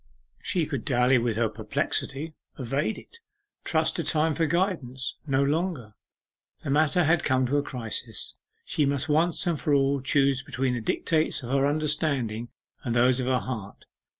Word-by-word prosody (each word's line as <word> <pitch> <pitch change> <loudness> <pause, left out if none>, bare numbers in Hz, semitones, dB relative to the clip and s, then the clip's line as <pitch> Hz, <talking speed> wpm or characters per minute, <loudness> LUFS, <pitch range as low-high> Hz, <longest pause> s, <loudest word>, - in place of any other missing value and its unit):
She 175 -5 0
could 140 -7 -4
dally 125 0 +3
with 115 -2 -1
her 115 0 +2
perplexity, 135 +7 -2 0.2
evade 135 - -1
it, 465 - -14 0.4
trust 160 -1 +1
to 170 - -1
time 155 +1 +2
for 165 +1 +1
guidance, 150 -7 -1
no 135 0 +2
longer. 145 - -1 0.7
The 140 - -2
matter 155 +5 +3
had 165 +1 +2
come 130 -1 +2
to 140 +4 +1
a - - +3
crisis: 115 -4 -4 0.3
she 150 - 0
must 140 +1 0
once 160 +4 +2
and 165 -6 -1
for 145 +2 +2
all 140 0 +2
choose 135 0 +2
between 130 -1 -2
the 120 - -2
dictates 155 +6 0
of 120 - -5
her 140 0 +3
understanding 145 -7 -1 0.3
and 120 -1 -2
those 125 +2 +4
of 125 - -2
her 130 -1 +3
heart. 110 -6 -6
140 Hz, 170 wpm, -26 LUFS, 125-155 Hz, 0.7 s, those